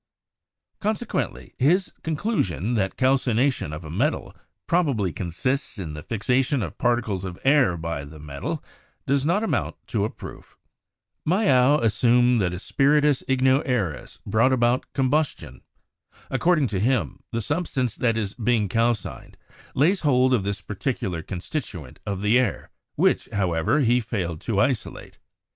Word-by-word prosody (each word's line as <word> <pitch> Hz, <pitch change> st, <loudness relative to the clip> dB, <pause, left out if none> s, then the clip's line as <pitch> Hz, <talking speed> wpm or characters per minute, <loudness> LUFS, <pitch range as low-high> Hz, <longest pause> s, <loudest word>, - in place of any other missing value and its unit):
Consequently, 215 Hz, +2 st, -3 dB
his 175 Hz, +9 st, +3 dB
conclusion 140 Hz, -, -1 dB
that 95 Hz, -5 st, -1 dB
calcination 130 Hz, -, +2 dB
of 75 Hz, +2 st, -7 dB
a 75 Hz, -, -7 dB
metal 130 Hz, -, -1 dB, 0.3 s
probably 135 Hz, -, +1 dB
consists 130 Hz, -, -2 dB
in 85 Hz, -6 st, -5 dB
the 75 Hz, -, -7 dB
fixation 125 Hz, -, 0 dB
of 85 Hz, -, -7 dB
particles 115 Hz, -6 st, 0 dB
of 90 Hz, -2 st, -6 dB
air 135 Hz, -11 st, +4 dB
by 80 Hz, -3 st, -4 dB
the 75 Hz, +2 st, -11 dB
metal, 70 Hz, -2 st, -5 dB, 0.4 s
does 140 Hz, +1 st, +1 dB
not 195 Hz, +6 st, +2 dB
amount 225 Hz, -, -1 dB
to -, -, -1 dB
a -, -, 0 dB
proof. -, -, -11 dB, 0.7 s
Mayow 150 Hz, -, +4 dB
assumed 120 Hz, +2 st, +3 dB
that 90 Hz, -2 st, +1 dB
a 90 Hz, -, -4 dB
"spiritus 145 Hz, +6 st, +2 dB
igno 130 Hz, +1 st, +3 dB
aereus" 110 Hz, -, -2 dB
brought 110 Hz, +6 st, +3 dB
about 120 Hz, 0 st, +1 dB
combustion. 130 Hz, -, -1 dB, 0.7 s
According 170 Hz, -4 st, +3 dB
to 100 Hz, -3 st, -2 dB
him, 125 Hz, +4 st, 0 dB
the 115 Hz, -, -1 dB
substance 130 Hz, -, -1 dB
that 115 Hz, -2 st, +1 dB
is 105 Hz, -2 st, -2 dB
being 115 Hz, -3 st, +1 dB
calcined 115 Hz, 0 st, -1 dB, 0.4 s
lays 175 Hz, +9 st, +3 dB
hold 130 Hz, -3 st, +3 dB
of 120 Hz, -, +3 dB
this 100 Hz, 0 st, -3 dB
particular 100 Hz, -5 st, -3 dB
constituent 90 Hz, -, -6 dB
of 100 Hz, -1 st, -3 dB
the 110 Hz, +4 st, +4 dB
air, 130 Hz, -, -2 dB, 0.2 s
which, -, -, +2 dB
however, 95 Hz, -, +1 dB
he 120 Hz, -1 st, +3 dB
failed 95 Hz, -9 st, -3 dB
to 105 Hz, -4 st, -1 dB
isolate. 115 Hz, +2 st, -2 dB
120 Hz, 140 wpm, -24 LUFS, 95-135 Hz, 0.7 s, air